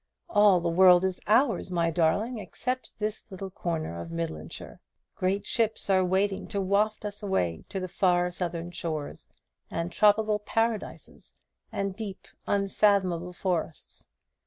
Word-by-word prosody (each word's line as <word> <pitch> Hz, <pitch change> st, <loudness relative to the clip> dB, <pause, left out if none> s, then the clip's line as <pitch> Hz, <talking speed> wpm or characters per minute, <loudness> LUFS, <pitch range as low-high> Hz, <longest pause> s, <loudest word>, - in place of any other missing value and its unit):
All 205 Hz, -3 st, +6 dB
the 170 Hz, -, -1 dB
world 180 Hz, +1 st, +6 dB
is 185 Hz, -1 st, -2 dB
ours, 230 Hz, 0 st, +3 dB
my 170 Hz, -2 st, +1 dB
darling, 200 Hz, +9 st, +1 dB
except 255 Hz, +4 st, -4 dB
this 215 Hz, 0 st, -3 dB
little 190 Hz, -1 st, -7 dB
corner 160 Hz, -, -3 dB
of 85 Hz, -, -8 dB
Midlandshire. 80 Hz, -1 st, -6 dB, 0.3 s
Great 195 Hz, +2 st, -1 dB
ships 225 Hz, -4 st, 0 dB
are 190 Hz, -1 st, +4 dB
waiting 190 Hz, +2 st, 0 dB
to 200 Hz, -, -3 dB
waft 205 Hz, +3 st, +1 dB
us 205 Hz, 0 st, -5 dB
away 90 Hz, -, -1 dB
to 190 Hz, -2 st, -3 dB
far 180 Hz, -1 st, +2 dB
Southern 175 Hz, -1 st, -4 dB
shores, 155 Hz, -4 st, -5 dB, 0.4 s
and 170 Hz, +1 st, -3 dB
tropical 210 Hz, +1 st, +3 dB
paradises, 225 Hz, 0 st, -3 dB, 0.3 s
and 195 Hz, -1 st, -2 dB
deep 205 Hz, -3 st, -7 dB, 0.2 s
unfathomable 195 Hz, -3 st, +2 dB
forests. 175 Hz, -4 st, -4 dB
190 Hz, 135 wpm, -28 LUFS, 170-205 Hz, 0.4 s, All